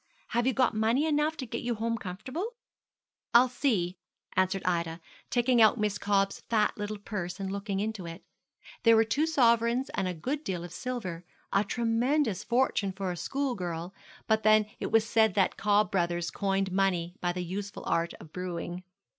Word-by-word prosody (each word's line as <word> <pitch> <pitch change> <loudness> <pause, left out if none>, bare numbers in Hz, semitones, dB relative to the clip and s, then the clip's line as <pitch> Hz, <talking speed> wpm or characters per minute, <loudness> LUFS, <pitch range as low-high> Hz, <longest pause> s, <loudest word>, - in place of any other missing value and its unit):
Have 240 +1 +1
you 265 - +3
got 255 -1 +2
money 225 +7 +2
enough 305 +1 +1
to 260 - -4
get 235 0 -4
you 240 -1 -1
home 230 +1 -1
comfortable?' 255 - -5 0.8
'I'll 250 +2 +7
see,' 195 -9 0 0.4
answered 185 +1 +1
Ida, 170 -2 0 0.3
taking 240 -1 +3
out 220 +2 +6
Miss 210 -1 0
Cobb's 195 -1 +1
fat 215 -2 +2
little 210 0 -4
purse 190 -3 -5
and 190 -1 -3
looking 200 0 -3
into 210 -4 -3
it. 165 +3 -8 0.6
There 230 -1 +6
were 225 - +6
two 280 +8 +1
sovereigns 235 -3 +3
and 190 - -1
a 180 - -3
good 275 - -3
deal 180 - -3
of 175 -1 -8
silver 195 -10 -4 0.3
a 200 - +4
tremendous 230 0 +1
fortune 235 -5 +1
for 190 -1 -3
a - - -4
schoolgirl; 180 - -3 0.3
but 220 0 +2
then 215 0 +5
it - - -3
was 225 -1 +4
said 220 -3 +3
that 195 -2 +2
Cobb 205 -2 +2
Brothers 175 -2 0
coined 195 -1 0
money 180 -3 +1
by 175 - +1
the 180 0 -3
useful 195 +3 -5
art 170 0 0
of 160 - -14
brewing. 180 0 -4
205 Hz, 180 wpm, -29 LUFS, 185-235 Hz, 0.8 s, I'll